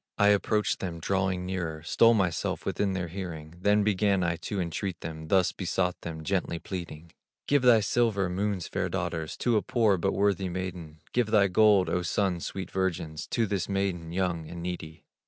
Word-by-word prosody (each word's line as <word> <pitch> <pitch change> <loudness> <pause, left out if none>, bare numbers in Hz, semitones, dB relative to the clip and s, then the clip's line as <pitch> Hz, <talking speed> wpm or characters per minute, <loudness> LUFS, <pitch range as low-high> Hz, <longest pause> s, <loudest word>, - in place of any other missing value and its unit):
I 105 0 +5
approached 105 +1 +2
them, 85 -3 -4
drawing 95 0 0
nearer, 85 -4 -3
Stole 115 +7 +5
myself 95 -6 -1
within 100 -2 0
their 90 -2 -2
hearing, 85 -3 -7
Then 105 +2 +3
began 100 -2 +2
I 85 -1 +1
to 100 +3 -4
entreat 90 +1 -3
them, 80 -1 -6
Thus 95 +1 +3
besought 90 0 -1
them, 80 -1 -6
gently 90 -1 -1
pleading: 85 -2 -7 0.4
'Give 145 -1 +3
thy 120 -3 +6
silver, 105 -3 +1
Moon's 95 0 -2
fair - - -2
daughters, 80 -1 -3
To 120 -3 +2
a - - +2
poor, 110 -5 +2
but 95 +3 0
worthy 100 -2 +1
maiden; 85 -4 -6
Give 120 -3 +2
thy 105 -3 +4
gold, 105 -1 +5
O 90 - 0
Sun's 90 0 -1
sweet 95 -2 -6
virgins, 85 -5 -2
To 115 - +1
this 100 -3 -2
maiden, 95 -4 -1
young 85 -3 -1
and 85 -1 -7
needy. 85 -3 -6
95 Hz, 180 wpm, -28 LUFS, 85-100 Hz, 0.4 s, thy